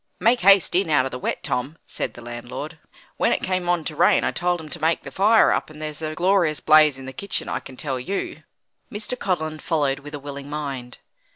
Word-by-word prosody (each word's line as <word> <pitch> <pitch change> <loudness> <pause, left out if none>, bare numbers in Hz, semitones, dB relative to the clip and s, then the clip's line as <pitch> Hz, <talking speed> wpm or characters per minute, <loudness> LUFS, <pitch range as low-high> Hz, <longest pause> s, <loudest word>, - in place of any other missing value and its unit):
"Make 230 +6 +4
haste 195 0 +5
in 180 -1 +2
out 145 -4 +3
of 130 - -4
the 125 - -5
wet, - - -3
Tom," 140 +6 -2
said - - -4
the 120 - -11
landlord; 120 +7 -7 0.4
"when - - +2
it - - 0
came 185 -1 -1
on 175 -2 +2
to 155 - -5
rain - - +4
I - - +1
told 175 0 0
'em 160 - -9
to - - -4
make 160 +1 +1
the - - -8
fire 215 +3 +5
up, - - -1
and 155 0 -12
there's 155 0 -5
a 155 0 -3
glorious 175 -4 +2
blaze 155 -2 +5
in 135 - -9
the 130 - -7
kitchen, 200 +9 -3
I - - -2
can 130 -2 -12
tell 135 -3 -3
you." 195 +11 -4 0.5
Mr. 210 +4 -3
Codlin 155 -8 -2
followed 145 -5 0
with 145 +1 -9
a - - -6
willing 140 0 -8
mind. 135 -5 -5
155 Hz, 230 wpm, -23 LUFS, 140-180 Hz, 0.5 s, haste